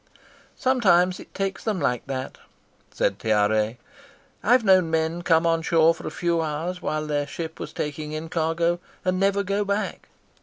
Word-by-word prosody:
"Sometimes 185 Hz, -8 st, +3 dB
it -, -, -12 dB
takes 195 Hz, -1 st, -2 dB
them 210 Hz, -4 st, -1 dB
like 125 Hz, -5 st, -1 dB
that," 130 Hz, -1 st, -5 dB, 0.5 s
said 100 Hz, -, -1 dB
Tiare. 110 Hz, +1 st, +1 dB, 0.6 s
"I've 245 Hz, +3 st, +4 dB
known 185 Hz, -4 st, +5 dB
men 160 Hz, +1 st, 0 dB
come 165 Hz, -1 st, +3 dB
on 165 Hz, -1 st, +2 dB
shore 165 Hz, 0 st, +4 dB
for 165 Hz, -, -8 dB
a -, -, -1 dB
few 170 Hz, -2 st, 0 dB
hours 160 Hz, +4 st, -3 dB
while 155 Hz, -2 st, -2 dB
their 145 Hz, -1 st, -1 dB
ship 160 Hz, +2 st, -6 dB
was -, -, -6 dB
taking 150 Hz, 0 st, -4 dB
in 155 Hz, +1 st, -5 dB
cargo, 170 Hz, +1 st, 0 dB, 0.3 s
and 185 Hz, 0 st, +1 dB
never 200 Hz, +1 st, +2 dB
go 200 Hz, +2 st, 0 dB
back. 200 Hz, +1 st, -3 dB
165 Hz, 165 wpm, -24 LUFS, 155-185 Hz, 0.6 s, known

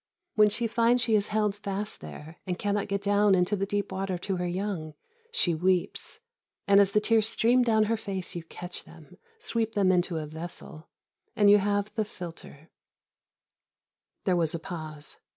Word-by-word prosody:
When 210 Hz, -1 st, +5 dB
she 235 Hz, +3 st, -2 dB
finds 235 Hz, +2 st, +2 dB
she 225 Hz, -, +1 dB
is 210 Hz, -1 st, +3 dB
held 210 Hz, -1 st, +1 dB
fast 200 Hz, 0 st, -5 dB
there, 150 Hz, -, -10 dB
and 180 Hz, -1 st, -2 dB
cannot 205 Hz, 0 st, -1 dB
get 200 Hz, 0 st, -2 dB
down 205 Hz, -1 st, +4 dB
into 180 Hz, +3 st, +2 dB
the 195 Hz, 0 st, -2 dB
deep 205 Hz, 0 st, -2 dB
water 190 Hz, -1 st, -2 dB
to 190 Hz, +1 st, -3 dB
her 180 Hz, 0 st, -2 dB
young, 175 Hz, -4 st, -3 dB, 0.4 s
she 180 Hz, -, +1 dB
weeps, 185 Hz, -, 0 dB, 0.5 s
and 200 Hz, 0 st, +6 dB
as 200 Hz, -1 st, +4 dB
the 210 Hz, -, +5 dB
tears 220 Hz, 0 st, +3 dB
stream 240 Hz, +2 st, +3 dB
down 220 Hz, -3 st, +3 dB
her 225 Hz, +2 st, 0 dB
face 195 Hz, -4 st, -3 dB
you 175 Hz, -, -4 dB
catch 175 Hz, +2 st, -3 dB
them, -, -, -16 dB, 0.2 s
sweep 225 Hz, -, -1 dB
them 195 Hz, -2 st, +4 dB
into 175 Hz, -2 st, +1 dB
a 155 Hz, -, -3 dB
vessel, 160 Hz, 0 st, -9 dB, 0.5 s
and 205 Hz, -3 st, +6 dB
you 205 Hz, -, +7 dB
have 205 Hz, +1 st, 0 dB
the 220 Hz, -1 st, 0 dB
philtre." 170 Hz, -6 st, -10 dB, 1.5 s
There 185 Hz, -3 st, +2 dB
was 165 Hz, -2 st, +1 dB
a -, -, -3 dB
pause. 155 Hz, -4 st, -7 dB
200 Hz, 180 wpm, -28 LUFS, 175-210 Hz, 1.5 s, you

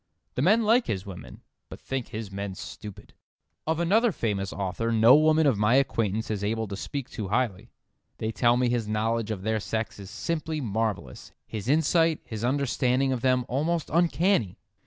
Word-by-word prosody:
The -, -, -2 dB
men 225 Hz, +1 st, +4 dB
like 230 Hz, +3 st, +3 dB
his 95 Hz, -1 st, -2 dB
women, 95 Hz, -3 st, -10 dB, 0.3 s
but -, -, -9 dB
think 135 Hz, -3 st, -4 dB
his 110 Hz, -2 st, -6 dB
men 100 Hz, -1 st, -5 dB
stupid. 105 Hz, +1 st, -10 dB, 0.5 s
Of 160 Hz, 0 st, 0 dB
another 215 Hz, +7 st, +3 dB
famous 100 Hz, -, -2 dB
author 100 Hz, +4 st, -2 dB
no 115 Hz, +3 st, +7 dB
woman 155 Hz, +1 st, +4 dB
of 130 Hz, -8 st, +2 dB
my 105 Hz, +4 st, +3 dB
acquaintance 110 Hz, -5 st, 0 dB
is 100 Hz, -2 st, -3 dB
able 110 Hz, +1 st, -1 dB
to 100 Hz, -, -4 dB
speak 135 Hz, +6 st, -5 dB
too 105 Hz, -6 st, -5 dB
highly. 110 Hz, -1 st, -1 dB, 0.5 s
They 110 Hz, -, -2 dB
tell 120 Hz, +4 st, +3 dB
me 125 Hz, 0 st, +2 dB
his 120 Hz, -3 st, 0 dB
knowledge 110 Hz, +1 st, -1 dB
of 100 Hz, -4 st, -4 dB
their 110 Hz, +1 st, 0 dB
sex 110 Hz, 0 st, -3 dB
is 95 Hz, -2 st, -9 dB
simply 155 Hz, +8 st, -3 dB
marvellous, 110 Hz, -, -3 dB
his 110 Hz, +1 st, -5 dB
insight, 160 Hz, +2 st, +3 dB
his 110 Hz, -1 st, -6 dB
understanding 130 Hz, 0 st, +1 dB
of 125 Hz, -, -3 dB
them 130 Hz, -1 st, +2 dB
almost 155 Hz, +5 st, -1 dB
uncanny. 170 Hz, -, +2 dB
115 Hz, 180 wpm, -27 LUFS, 105-140 Hz, 0.5 s, no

